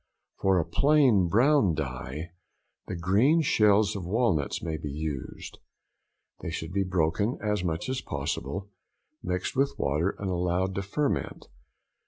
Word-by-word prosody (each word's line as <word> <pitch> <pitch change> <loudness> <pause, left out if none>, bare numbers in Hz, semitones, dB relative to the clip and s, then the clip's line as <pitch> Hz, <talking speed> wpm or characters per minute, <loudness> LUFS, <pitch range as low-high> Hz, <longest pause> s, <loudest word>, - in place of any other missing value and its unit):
For 95 -1 +3
a 85 - +1
plain 135 -11 +4
brown 115 - +3
dye, 70 +3 -5 0.6
the - - -4
green 105 - +3
shells 105 -5 +3
of 100 - -4
walnuts 95 - 0
may 80 -2 -2
be 75 -1 -5
used. 75 -2 -6 0.8
They - - -5
should 80 0 -5
be 100 0 +1
broken 90 +5 0
as 105 -3 -1
much 80 -1 -2
as 130 0 -2
possible, 75 +7 -4 0.5
mixed 90 -4 -3
with 135 +1 +1
water, 75 +8 0
and 95 -2 -3
allowed 90 +1 0
to 100 - -2
ferment. 140 +9 -2
95 Hz, 140 wpm, -27 LUFS, 80-105 Hz, 0.8 s, plain